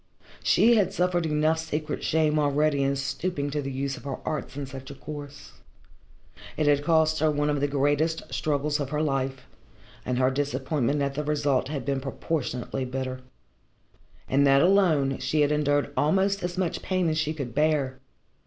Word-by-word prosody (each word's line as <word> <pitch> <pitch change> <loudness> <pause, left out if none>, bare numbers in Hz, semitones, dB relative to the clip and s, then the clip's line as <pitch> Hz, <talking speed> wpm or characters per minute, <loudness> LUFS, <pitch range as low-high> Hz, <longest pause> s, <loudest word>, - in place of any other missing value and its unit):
She 235 0 +4
had 195 -3 +2
suffered 175 -2 +1
enough 155 +1 +1
secret 155 -1 -3
shame 155 -1 +2
already 145 0 +2
in 135 0 +1
stooping 145 +2 -2
to 150 0 -1
the 135 -1 -4
use 135 +1 -3
of - - -12
her 135 -2 -3
arts 150 -2 -4
in 145 - -3
such 135 +1 -9
a 140 - -8
course. 145 -1 -9 1.1
It 155 - +1
had 145 -1 +3
cost 160 0 +3
her 155 +1 +3
one 145 0 +1
of 145 - 0
the 145 - +1
greatest 145 +3 +1
struggles 150 0 0
of 140 -2 -3
her 150 +1 -1
life, 135 -2 -2 0.6
and 125 -1 -2
her 130 +1 +3
disappointment 140 0 -1
at 140 0 -1
the 150 +2 -3
result 145 -3 +1
had 140 -3 -4
been 135 -1 -1
proportionately 135 -2 -3
bitter. 130 0 -4 1.1
In 140 +2 +3
that 135 +1 +5
alone 170 -8 +3
she 155 - 0
had 145 0 +3
endured 145 -1 +1
almost 195 +6 +2
as 175 0 -4
much 185 -3 -1
pain 185 -2 0
as 155 0 0
she 155 -1 0
could 135 -6 -5
bear. 145 -2 +1
145 Hz, 180 wpm, -26 LUFS, 135-155 Hz, 1.1 s, that